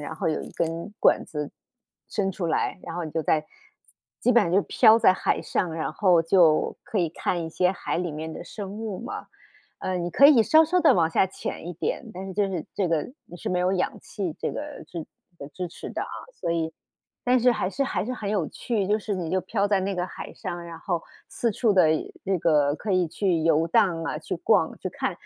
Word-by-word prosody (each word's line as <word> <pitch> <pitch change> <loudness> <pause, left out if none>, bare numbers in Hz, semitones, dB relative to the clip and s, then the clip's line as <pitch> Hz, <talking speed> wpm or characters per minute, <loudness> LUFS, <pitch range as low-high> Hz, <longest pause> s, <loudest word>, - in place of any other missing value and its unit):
然 155 +2 -6
后 165 0 -1
有 155 - -1
一 - - -8
根 165 +5 -3
管 - - +4
子 150 -2 -5 0.6
伸 195 -3 0
出 180 -2 -3
来， 165 - 0
然 - - -7
后 175 -1 -3
你 155 - -6
就 160 - -1
在 155 +1 +1 0.8
基 250 - +3
本 235 - +6
上 170 - -2
就 195 +2 +4
飘 225 -2 +5
在 185 - +6
海 - - 0
上， 170 -3 -1
然 155 -3 -3
后 180 -4 +4
就 165 -2 +4
可 220 - -6
以 170 -3 +1
看 175 0 -2
一 160 - -6
些 180 +2 +2
海 175 - -3
里 175 -2 -2
面 160 +1 -5
的 - - -7
生 195 +1 -7
物 210 -2 -5
嘛。 240 - -6 0.5
呃， 185 -1 -2
你 175 - -2
可 275 - +4
以 265 -7 +7
稍 315 +7 +6
稍 360 +3 +2
地 325 - +6
往 165 -2 +2
下 190 - +3
潜 175 -2 -6
一 - - -4
点， 180 +7 -3
但 190 +1 -6
是 190 - -6
就 200 0 +1
是 175 -5 -3
这 190 -3 0
个 165 - -1
你 175 - -11
是 - - -5
没 180 - +1
有 180 +1 +2
氧 185 -1 0
气 180 -6 -4
这 - - -1
个 295 0 -6
是 165 -3 -6 0.5
支 180 -2 -4
持 170 - -8
的 - - -4
啊， - - -6 0.3
所 - - -1
以 160 -1 -1 0.5
但 250 +1 +4
是 250 +1 +5
还 185 - -1
是 275 - 0
还 265 - -1
是 250 - -3
很 210 -5 -4
有 195 -7 0
趣。 215 -5 -2
就 210 +2 +3
是 210 -1 -3
你 175 -4 -3
就 190 - +1
飘 200 +3 0
在 200 -2 +3
那 195 +1 -1
个 180 0 -1
海 - - -8
上， 175 0 -6
然 170 -1 -8
后 170 -1 -2 0.3
四 235 - -1
处 220 0 +2
的 180 -5 +5 0.4
那 190 -2 +1
个 150 -3 +3
可 205 - -3
以 180 -2 +2
去 175 0 0
游 165 0 +3
荡 175 -5 +2
啊， - - -2
去 - - -4
逛、 - - +2
去 - - -4
看。 - - -2
180 Hz, 255 characters per minute, -25 LUFS, 165-205 Hz, 0.8 s, 以